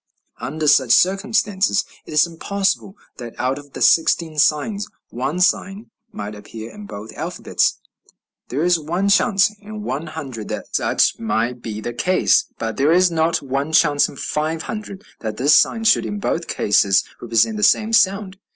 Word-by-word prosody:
Under 155 +2 -3
such 135 -4 +4
circumstances 195 +1 +2 0.2
it - - -9
is 150 +3 +4
possible 200 0 -1 0.2
that 120 -2 -9
out 130 +2 -1
of 145 -1 -16
the - - -2
sixteen 160 -1 +3
signs 200 +8 +1 0.2
one 135 +8 -3
sign 195 +4 0 0.2
might 105 0 -6
appear 110 +2 -10
in 210 -1 -11
both 105 - -9
alphabets; - - -1 0.7
there 140 +5 -1
is 175 -1 +3
one 175 +6 -1
chance 200 0 +3
in 210 0 -9
one 155 -3 -4
hundred 135 -9 -7
that - - -6
such - - +1
might 115 +2 -2
be 110 -2 -6
the 120 - -5
case; 185 +10 +2
but 115 -1 -4
there 140 +3 +3
is 180 +1 +4
not 160 -1 0
one 140 +3 -3
chance 150 -3 +4
in - - -12
five 155 +3 -3
hundred 210 -2 -7 0.2
that 110 -2 -5
this 145 +3 +4
sign 225 +8 +3
should 220 - +3
in 205 - -4
both 170 -4 -2
cases 100 -2 +2 0.2
represent 120 - +1
the - - -4
same 220 +1 +3
sound. 195 -2 +2
160 Hz, 170 wpm, -20 LUFS, 130-195 Hz, 0.7 s, such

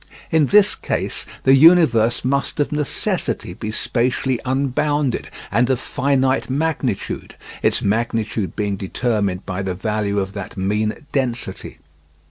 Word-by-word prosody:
In 160 -3 +4
this 205 +3 +5
case - - -3 0.2
the 135 - +5
universe 135 -8 +5
must 140 +3 -1
of 145 - +1
necessity 150 -10 -1
be 105 +4 -6
spatially 125 +3 0
unbounded 140 +1 0 0.2
and 120 +5 +2
of 130 -2 +1
finite 135 0 0
magnitude, 140 -6 -2 0.3
its - - +1
magnitude 110 -2 -1
being 100 -2 -1
determined 100 -2 -1
by 95 +1 -3
the 95 -2 -3
value 105 +1 -1
of 95 -1 -1
that 100 -1 -7
mean 105 +7 -1
density. 125 -4 -3
120 Hz, 125 wpm, -20 LUFS, 105-140 Hz, 0.3 s, this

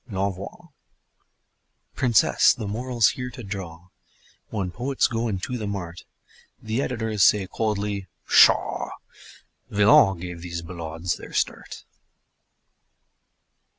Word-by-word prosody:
L'ENVOI 100 -1 -4 1.2
Princess, 120 -5 +4
the 110 - -6
moral's 120 +1 +1
here 125 -1 -5
to 125 0 -10
draw: 90 -4 -7 0.6
When 95 -5 -3
poets 130 +6 0
go 115 0 -1
into 115 +5 -3
the 105 - -4
mart 90 -4 -6 0.5
The 110 +4 -2
editors 110 -5 -2
say 100 0 +5
coldly: 100 -1 -2 0.2
"Pshaw! - - +4 0.8
Villon 100 -2 +5
gave 90 -1 -7
these 85 -1 -5
ballades 85 0 -4
their - - -11
start." - - -3
100 Hz, 105 wpm, -24 LUFS, 90-115 Hz, 1.2 s, say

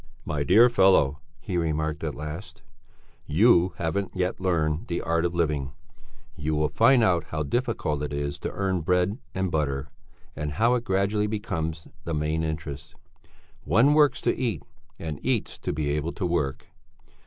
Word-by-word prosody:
"My 75 -1 -2
dear 110 - +6
fellow," 95 - +4 0.2
he 90 - -3
remarked 80 -1 -1
at 75 -3 -3
last, 75 +6 -8 0.6
"you 90 +1 +4
haven't 95 +4 -2
yet 90 0 -1
learned 85 0 0
the 85 - -2
art 85 0 0
of 85 0 -1
living; 75 -5 -1 0.6
you 75 +1 -2
will 75 0 +1
find 115 +1 +4
out 85 -6 +2
how 80 0 -3
difficult 95 - -1
it 75 -1 -3
is 70 0 -3
to - - -4
earn 95 -3 -1
bread 90 - +1 0.2
and 95 -1 -1
butter, 70 -3 -1 0.5
and 75 -1 -4
how 115 +10 +3
it 120 -1 -1
gradually 100 +2 +1
becomes 80 -7 -3 0.2
the 85 - -3
main 75 +1 0
interest. 75 -3 -5 0.7
One 115 - +4
works 150 -1 +4
to - - +1
eat 120 -5 -2 0.3
and 80 -3 -5
eats - - -1
to - - -3
be 75 0 -1
able 75 +3 -2
to 95 - -3
work. 70 -6 -1
80 Hz, 165 wpm, -26 LUFS, 75-95 Hz, 0.7 s, dear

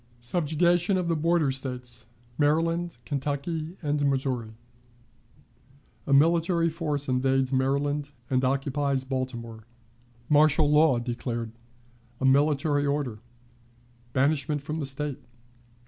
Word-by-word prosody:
Subjugation 170 - +1
of 180 -2 -1
the 165 - +2
Border 160 -2 +2
States, 125 -4 -4 0.3
Maryland, 165 +2 +1
Kentucky, 150 +6 -3
and 145 -1 0
Missouri. 130 -5 -2 1.5
A - - -2
Military 165 +3 +3
Force 150 -4 -3
invades 130 +1 +1
Maryland 140 +2 0 0.2
and 130 0 +1
occupies 135 0 0
Baltimore. 125 -4 -5 0.6
Martial 150 0 +4
Law 150 -3 +5
declared. 120 -1 -4 0.7
A - - -1
Military 145 +1 +3
Order. 140 -6 -1 0.9
Banishment 145 +2 +1
from 155 +2 -4
the 145 - -2
State. 140 0 -3
145 Hz, 100 wpm, -27 LUFS, 130-155 Hz, 1.5 s, Law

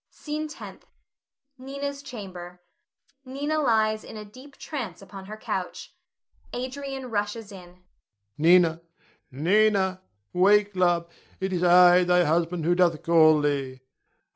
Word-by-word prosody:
SCENE 305 +1 -5
TENTH. 305 - -11 0.7
[Nina's 280 +1 -6
chamber. 185 -9 -9 0.6
Nina 285 +4 -3
lies 220 -5 +1
in - - -10
a 210 - -8
deep 260 +7 -15
trance 240 - -6
upon 195 -1 -11
her 215 +2 -9
couch. - - -5 0.6
Adrian 260 0 -6
rushes 210 +1 -3
in.] 180 -3 -12
Adrian. 180 +1 -25 0.6
Nina! 170 0 +4 0.5
Nina! 190 +5 +1 0.3
wake, 205 +2 +3
love, 175 -2 +1 0.3
it 190 0 -3
is 175 - -1
I 180 0 +6
thy 180 0 +3
husband 165 +1 0
who 175 - +3
doth 175 -3 +1
call 155 -2 +5
thee. 135 -3 -2
190 Hz, 125 wpm, -25 LUFS, 175-245 Hz, 0.7 s, I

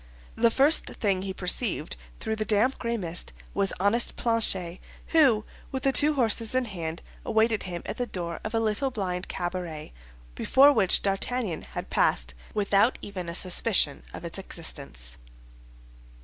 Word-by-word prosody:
The 235 0 +4
first 280 +7 +4
thing 195 -4 -1
he 195 0 -4
perceived 185 -2 0 0.2
through 220 0 -2
the 215 - 0
damp 220 +5 +2
gray 235 -1 -2
mist 175 -3 -2 0.2
was 200 -1 +1
honest 205 +5 +3
Planchet, 195 -7 +1 0.3
who, 260 -10 +4 0.3
with 265 -1 -4
the 270 - +3
two 300 +2 +5
horses 230 -2 +2
in 255 -1 +2
hand, 170 -6 -5 0.2
awaited 220 -1 +2
him 175 -1 -5
at - - -5
the 245 - -2
door 170 -5 -4
of 215 +2 -4
a - - +3
little 225 +5 0
blind 185 -6 -3
cabaret, 175 - -5 0.4
before 275 - +5
which 195 -7 +3
D'Artagnan 195 -2 -1
had - - -6
passed - - +2 0.2
without 205 +3 +2
even 185 -4 -6
a 170 - -5
suspicion 185 -4 +1
of - - -8
its 170 +3 -5
existence. 135 - -8
205 Hz, 155 wpm, -27 LUFS, 175-235 Hz, 0.4 s, two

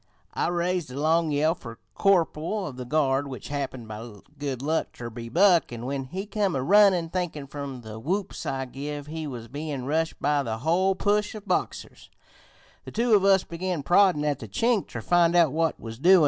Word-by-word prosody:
I - - 0
raised 175 -2 -1
the 130 +2 -6
long 160 +2 +2
yell 150 +2 +2
fer 115 -9 -10 0.2
corporal 190 +1 +1
of 140 - -6
the 125 0 -6
guard, 140 0 +1
which 130 -3 -8
happened, 135 -5 -4
by 110 +1 -8 0.3
good 135 -3 -3
luck, 160 +3 -1
ter 120 -1 -7
be 115 0 -7
Buck, 175 0 +4
an' 120 0 -6
when 135 0 -3
he 185 +9 -5
come 205 -4 -1
a 130 - -1
runnin', 190 -1 +5
thinkin' 170 -5 -3
from 140 -2 -7
the 110 -1 -8
whoops 185 - -3
I 135 -1 -2
give 145 +3 -6
we 160 0 -5
was 120 -4 -7
bein' 145 0 -5
rushed 160 +3 -1
by 145 0 +2
the 115 -4 -3
hole 175 +9 +2
push 210 +2 +1
of 210 -1 -9
Boxers, 185 - -3 0.7
the - - -9
two 235 0 +1
of 200 -2 +5
us 195 -1 +5
began 170 -2 -3
proddin' 175 -3 +4
at 145 -3 0
the 110 - -8
Chink 225 - +1
ter - - -6
find 175 -1 +3
out 170 -5 +5
what 160 +1 0
was 115 0 -8
doin'. 185 +5 +7
155 Hz, 205 wpm, -26 LUFS, 135-180 Hz, 0.7 s, doin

